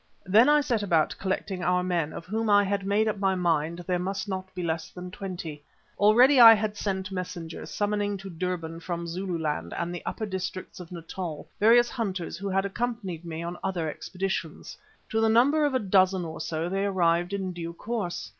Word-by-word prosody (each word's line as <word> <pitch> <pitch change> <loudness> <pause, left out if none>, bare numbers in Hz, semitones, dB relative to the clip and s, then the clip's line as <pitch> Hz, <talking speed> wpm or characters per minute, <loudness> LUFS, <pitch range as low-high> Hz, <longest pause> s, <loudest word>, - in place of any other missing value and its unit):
Then 215 +8 +6
I 295 0 +5
set 240 -6 0
about 165 -6 +2
collecting 190 -1 -2
our 180 0 +2
men, 175 -4 0
of 165 - -8
whom 220 +3 -1
I 205 0 +6
had 200 0 -1
made 210 +2 +2
up 210 -2 -1
my 195 -1 +2
mind 170 -1 0
there 180 0 0
must 195 +3 -3
not 190 -1 -4
be 180 - -3
less 160 -1 -2
than 180 0 -9
twenty. 175 -6 -6 0.4
Already 245 +7 +6
I 225 -1 +11
had 210 0 -2
sent 190 -2 -3
messengers 180 -3 -6
summoning 205 -1 -1
to 195 0 -9
Durban 165 -1 -4
from 170 0 -4
Zululand 165 - -3
and 170 +1 -2
the 175 - -6
upper 220 - -3
districts 185 -2 -5
of 180 -1 -10
Natal 170 -2 -6
various 240 +3 +5
hunters 190 -9 -3
who 195 +3 -4
had 195 +1 +1
accompanied 200 -5 -3
me 165 -1 -5
on 170 +1 -5
other 175 -4 -1
expeditions. 180 0 -4 0.3
To 220 - +1
the 225 - +4
number 280 +7 +4
of 285 -3 0
a - - +5
dozen 190 -3 +3
or 160 - -6
so 160 +1 -2
they 195 +2 -1
arrived 175 -2 +2
in 190 -2 -3
due 170 -1 -6
course. 200 - -4
185 Hz, 195 wpm, -27 LUFS, 170-205 Hz, 0.4 s, I